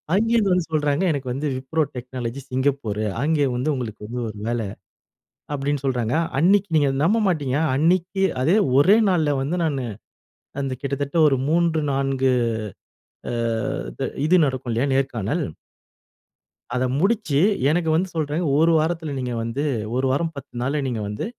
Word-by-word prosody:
அங்கேந்து 225 Hz, -1 st, +2 dB
வந்து 180 Hz, -2 st, +2 dB
சொல்றாங்க. 150 Hz, +1 st, +1 dB
எனக்கு 140 Hz, -3 st, -3 dB
வந்து 140 Hz, +4 st, -2 dB
wipro 135 Hz, +5 st, -1 dB, 0.2 s
technology 125 Hz, 0 st, -5 dB
சிங்கப்பூரு 130 Hz, -5 st, -1 dB, 0.2 s
அங்க 155 Hz, +2 st, +1 dB, 0.2 s
வந்து 125 Hz, +5 st, -1 dB
உங்களுக்கு 110 Hz, -5 st, -5 dB
வந்து 120 Hz, +2 st, -4 dB
ஒரு 105 Hz, -, -9 dB
வேலை 120 Hz, -1 st, -1 dB, 0.9 s
அப்படினு 145 Hz, 0 st, -1 dB
சொல்றாங்க. 125 Hz, -3 st, 0 dB, 0.2 s
அன்னைக்கி 195 Hz, +6 st, +4 dB
நீங்க 145 Hz, -2 st, +4 dB
நம்ப 200 Hz, +9 st, +3 dB
மாட்டீங்க? 145 Hz, -7 st, 0 dB, 0.2 s
அன்னைக்கி 180 Hz, +5 st, +1 dB, 0.2 s
அதே 165 Hz, +9 st, +3 dB, 0.2 s
ஒரே 185 Hz, +9 st, +6 dB
நாள்ல 155 Hz, -6 st, +2 dB
வந்து 160 Hz, +7 st, -1 dB
நானு 140 Hz, -5 st, -1 dB, 0.8 s
அந்த 135 Hz, -1 st, -2 dB
கிட்டத்தட்ட 140 Hz, +2 st, +2 dB
3, 165 Hz, 0 st, +2 dB
4 135 Hz, -1 st, +1 dB, 1.0 s
அ -, -, -3 dB, 0.7 s
து -, -, -1 dB, 0.2 s
இது 180 Hz, +4 st, +5 dB
நடக்கும் 130 Hz, -2 st, -3 dB
இல்லையா? 120 Hz, +5 st, 0 dB
நேர்காணல். 135 Hz, -, -1 dB, 1.3 s
அத 125 Hz, -, +1 dB, 0.2 s
முடிச்சு 190 Hz, -7 st, +1 dB, 0.3 s
எனக்கு 165 Hz, +1 st, +1 dB
வந்து 185 Hz, +3 st, 0 dB
சொல்றாங்க.ஒரு 155 Hz, 0 st, +2 dB
வாரத்தில 160 Hz, -1 st, -1 dB
நீங்க 125 Hz, -1 st, -3 dB
வந்து 115 Hz, +5 st, -2 dB, 0.3 s
1 130 Hz, -, +1 dB
வாரம் 160 Hz, +4 st, -1 dB
10 140 Hz, -2 st, -10 dB
நாள்ல 140 Hz, +4 st, 0 dB
நீங்க 115 Hz, -4 st, -2 dB
வந்து 105 Hz, +1 st, -4 dB
140 Hz, 140 wpm, -23 LUFS, 130-165 Hz, 1.3 s, ஒரே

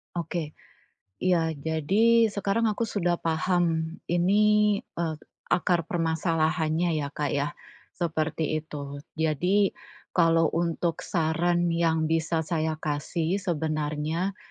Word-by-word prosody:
Oke. 165 Hz, -2 st, -3 dB, 0.7 s
Iya. 165 Hz, -3 st, +2 dB
Jadi, 195 Hz, +11 st, +3 dB
sekarang 200 Hz, +2 st, 0 dB
aku 215 Hz, +2 st, 0 dB
sudah 175 Hz, -5 st, 0 dB
paham, 165 Hz, 0 st, 0 dB
ini, 210 Hz, +4 st, +3 dB
eee, 165 Hz, -2 st, -3 dB, 0.3 s
akar 175 Hz, -2 st, +1 dB
permasalahannya, 165 Hz, 0 st, +1 dB
ya 140 Hz, -, -3 dB
Kak, 145 Hz, 0 st, -3 dB
ya. 145 Hz, 0 st, 0 dB, 0.5 s
Seperti 155 Hz, -2 st, -1 dB
itu. 145 Hz, -2 st, -7 dB, 0.2 s
Jadi, 180 Hz, +6 st, +2 dB, 0.4 s
kalau 165 Hz, -1 st, +4 dB
untuk 170 Hz, 0 st, -1 dB
saran 170 Hz, 0 st, +1 dB
yang 165 Hz, -1 st, +2 dB
bisa 160 Hz, 0 st, 0 dB
saya 155 Hz, 0 st, -1 dB
kasih, 160 Hz, +5 st, -2 dB
sebenarnya, 155 Hz, +1 st, -2 dB
165 Hz, 105 wpm, -27 LUFS, 155-180 Hz, 0.7 s, kalau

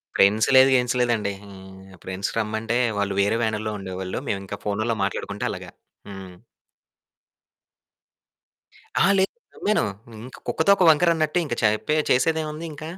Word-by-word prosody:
Friends 105 Hz, +3 st, +4 dB
లేదు 130 Hz, +1 st, +8 dB
గిన్స్ 125 Hz, 0 st, +1 dB
లేదండి. 115 Hz, -5 st, 0 dB
హ్మ్. 95 Hz, -1 st, -13 dB
ఫ్రెండ్స్ 95 Hz, +1 st, -4 dB
రమ్మంటే 110 Hz, +1 st, -1 dB, 0.2 s
వాళ్ళు 100 Hz, -1 st, -1 dB
వేరే 100 Hz, +3 st, +1 dB
వ్యానుల్లో 110 Hz, -1 st, -2 dB
ఉండేవాళ్ళు. 95 Hz, -1 st, -5 dB
మేమింకా 100 Hz, -1 st, -4 dB
ఫోనుల్లొ 110 Hz, +3 st, -1 dB
మాట్లాడుకుంటూ 100 Hz, +1 st, -3 dB
అలాగా. -, -, -8 dB, 0.4 s
హ్మ్. 95 Hz, -2 st, -9 dB, 2.6 s
అహా! -, -, +4 dB
లేదు 190 Hz, 0 st, +1 dB, 0.2 s
నమ్మాను. 210 Hz, +1 st, +1 dB, 0.4 s
ఇంక 130 Hz, -, -12 dB
కుక్క -, -, -1 dB
తోక 200 Hz, -, +5 dB
వంకరన్నట్టు 160 Hz, 0 st, +3 dB
ఇంక 130 Hz, -, -4 dB
చెప్పె 110 Hz, +8 st, +1 dB
చేసేదేముంది 155 Hz, +3 st, 0 dB
ఇంక. 150 Hz, 0 st, -10 dB
110 Hz, 125 wpm, -23 LUFS, 100-140 Hz, 2.6 s, లేదు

